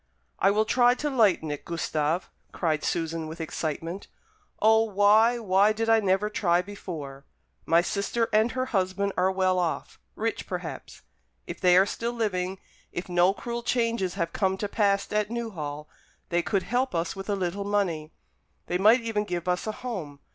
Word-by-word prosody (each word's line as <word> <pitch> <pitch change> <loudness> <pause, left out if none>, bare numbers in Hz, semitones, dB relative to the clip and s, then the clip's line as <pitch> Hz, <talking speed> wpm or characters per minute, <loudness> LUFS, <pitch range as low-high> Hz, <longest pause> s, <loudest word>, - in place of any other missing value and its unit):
"I 195 - +4
will 215 +2 +2
try 245 +2 +4
to 295 +2 -2
lighten 200 - +3
it, 145 - -5
Gustave," 165 0 -1 0.3
cried 155 -3 -1
Susan, 165 -1 -2
with 160 +2 -8
excitement. 165 +3 -4 0.5
"O, 220 +1 +5
why, 215 +2 +4
why 205 -1 +3
did 225 +1 -2
I 225 0 +6
never 195 0 +1
try 175 -5 +2
before! 155 -9 -8 0.4
My 165 +1 +5
sister 210 +5 -1
and 220 +2 +3
her 255 0 -1
husband 195 0 0
are 185 +1 +2
well 185 -1 +1
off 170 -2 -3 0.2
rich - - -3
perhaps. - - -6 0.4
If - - -8
they 180 -1 +6
are 190 - +6
still 235 +3 -3
living, 190 -5 -2 0.3
if 175 - -5
no 175 +1 +4
cruel 235 +4 -5
changes 230 -6 0
have 170 0 -2
come 190 -2 0
to 205 - -2
pass 200 -1 +1
at 210 0 +1
Newhall, 160 -11 -5 0.4
they 175 0 +2
could 195 +2 0
help 250 -1 -1
us 165 +1 -1
with 195 +1 -7
a 205 - +1
little 190 +1 -2
money. 185 -7 -1 0.5
They 180 - -1
might 220 +6 +6
even 225 -2 -1
give 175 -3 -4
us 180 +3 0
a - - 0
home. 165 - -5
195 Hz, 175 wpm, -27 LUFS, 175-220 Hz, 0.5 s, I